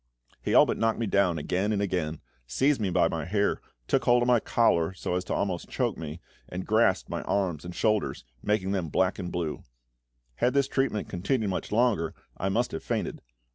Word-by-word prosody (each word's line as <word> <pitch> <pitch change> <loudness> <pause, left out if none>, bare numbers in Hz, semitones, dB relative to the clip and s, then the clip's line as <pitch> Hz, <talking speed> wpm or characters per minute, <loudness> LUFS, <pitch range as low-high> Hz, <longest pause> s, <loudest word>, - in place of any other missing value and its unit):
He - - 0
all - - +8
but - - -2
knocked 115 0 +2
me 115 - -1
down 100 -4 +2
again 95 +7 -1
and 105 - +1
again, 90 -6 -2 0.3
seized 135 - +2
me 100 - +1
by 85 - +3
the 80 -2 -3
hair, 100 +5 0 0.3
took - - +1
hold 120 0 +5
of - - 0
my 125 -1 +5
collar 95 -7 +2
so 90 - -3
as 90 0 0
to - - -3
almost 95 -4 -2
choke - - 0
me, 80 0 -6 0.3
and 90 +1 -5
grasped 95 - +3
my - - -3
arms 90 -6 -1
and 90 0 -7
shoulders, 105 - 0 0.2
making 105 -2 0
them 90 -5 -1
black 95 +5 +1
and 90 -2 -4
blue. 85 -3 -3 0.8
Had 125 - +1
this 140 -1 +3
treatment 135 -7 0
continued 105 +3 -1
much 90 - -4
longer, 105 -8 +2 0.2
I 95 - -2
must 120 +5 0
have 80 - -4
fainted. - - -3
95 Hz, 205 wpm, -28 LUFS, 85-110 Hz, 0.8 s, all